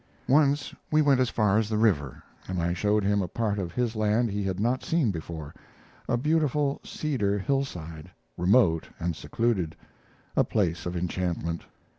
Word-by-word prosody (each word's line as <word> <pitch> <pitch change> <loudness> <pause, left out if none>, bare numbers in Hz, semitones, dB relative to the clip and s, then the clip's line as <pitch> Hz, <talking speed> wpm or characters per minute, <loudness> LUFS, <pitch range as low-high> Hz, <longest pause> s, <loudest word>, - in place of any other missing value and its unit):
Once 145 +1 +3 0.2
we 155 - +3
went 140 -4 +4
as 130 -2 +2
far 105 -2 +2
as 110 -1 -1
the 110 - 0
river, 85 - +1 0.2
and 95 -1 -2
I 85 +1 0
showed 105 +3 +1
him 100 +1 +2
a 90 - -2
part 105 +1 -1
of 90 -3 -3
his 120 +3 -1
land 110 +2 +1
he 100 +1 -2
had 95 -1 -2
not 120 +4 0
seen 160 -10 +1
before 80 -3 -6 0.6
a 120 - +2
beautiful 150 0 +1
cedar 115 -10 -1
hillside, 90 - -3 0.3
remote 90 -3 +3
and 85 -1 -1
secluded, 95 -3 -1 0.6
a - - +5
place 85 -6 -1
of 90 0 -3
enchantment. 85 -1 -2
105 Hz, 165 wpm, -27 LUFS, 85-125 Hz, 0.6 s, a